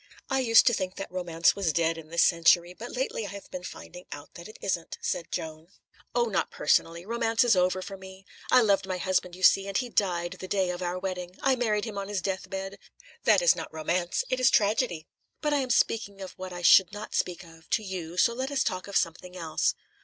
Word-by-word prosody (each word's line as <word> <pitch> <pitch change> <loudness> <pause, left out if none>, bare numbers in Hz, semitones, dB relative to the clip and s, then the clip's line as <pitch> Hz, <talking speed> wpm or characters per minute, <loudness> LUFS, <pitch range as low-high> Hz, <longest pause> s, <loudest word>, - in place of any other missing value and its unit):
"I 270 - +2
used 230 -3 +6
to 240 - +4
think 185 -3 -2
that 195 - -7
romance 170 -2 +1
was 195 -5 0
dead 165 +1 +1
in 165 -1 -10
this 170 +1 +2
century, 170 +1 +4
but 230 +6 -8
lately 250 -4 -2
I - - -7
have 200 +1 -10
been 185 - -5
finding 180 0 -10
out 145 - -9
that 170 - -10
it 215 - -13
isn't," 175 -4 -3
said 170 - -3
Joan. 160 0 -5 0.5
"Oh, 240 -1 +3
not 200 -4 -1
personally. 165 +3 +1
Romance 230 +1 +1
is 240 -4 +4
over 185 +1 +1
for 195 0 -8
me. 190 0 -13 0.2
I 255 - +6
loved 200 -3 +2
my 185 -1 -2
husband, 180 -1 -1
you 185 - -10
see, 195 +1 +5
and 195 - -1
he 250 -1 -2
died 175 -5 -1
the 185 - -6
day 190 -1 0
of 175 0 -6
our 180 0 -2
wedding; 185 -1 -5
I 270 -1 +4
married 215 -4 0
him 210 -3 -5
on 195 - -5
his 200 -3 -3
death 190 -1 -3
bed. 195 0 -5 0.5
That - - +5
is - - +6
not - - -7
romance; 170 +3 -1
it 255 - +1
is 255 +1 +5
tragedy. 205 -7 +1 0.3
But 300 -1 0
I - - +3
am 265 -2 -2
speaking 215 -4 +1
of 190 -1 -7
what 185 0 -8
I 175 0 -7
should 180 +1 +7
not 205 +1 -8
speak 180 +1 -1
of, 165 -1 -17
to 220 - +1
you, 180 -3 -6
so 235 +5 +4
let 260 +3 -3
us 285 -2 +1
talk 185 -2 -3
of 200 - 0
something 180 +2 -2
else." 165 -3 0
190 Hz, 235 wpm, -27 LUFS, 175-215 Hz, 0.5 s, should